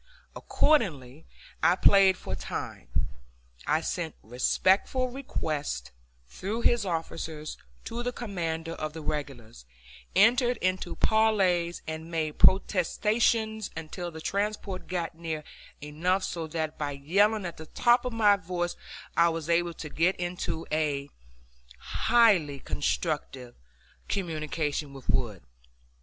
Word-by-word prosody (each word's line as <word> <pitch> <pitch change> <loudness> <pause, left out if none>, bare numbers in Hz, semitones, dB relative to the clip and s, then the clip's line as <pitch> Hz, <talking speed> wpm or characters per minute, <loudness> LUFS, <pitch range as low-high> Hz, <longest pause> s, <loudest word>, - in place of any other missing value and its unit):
Accordingly 160 - +1 0.3
I 180 - +5
played 190 -1 +6
for 95 - -6
time. 90 - -5 0.8
I 155 +2 +2
sent 165 -1 -3
respectful 190 - +2
requests 150 - -3 0.4
through 205 - -4
his 235 -4 +3
officers 160 -2 -4 0.3
to 235 +1 -4
the 245 +1 -1
commander 165 -9 -3
of 155 -2 -4
the 160 -1 -7
regulars, 125 - -5 0.5
entered 240 +4 +5
into 185 -2 -1
parleys, 190 -6 +2
and 160 +1 -6
made 155 -2 -2
protestations, 215 +3 +3
until 170 +2 -5
the 160 -1 -9
transport 200 0 -2
got 175 -2 -2
near 160 -2 -4 0.4
enough 175 +6 0
so 165 -3 -3
that 160 -1 -3
by 145 -1 -2
yelling 200 +9 +2
at 170 - -5
the 160 - -9
top 240 +8 +3
of 250 - -2
my 210 -3 +4
voice 175 -1 -3 0.4
I 170 0 +5
was 165 0 -3
able 170 0 +1
to 155 - -6
get 170 +5 +2
into 175 -2 -3
a 145 -2 -1 0.7
highly 200 - +3
constructive 135 -4 -2 0.5
communication 155 -5 -2
with 135 -2 -12
Wood. - - -1
170 Hz, 120 wpm, -28 LUFS, 155-200 Hz, 0.8 s, played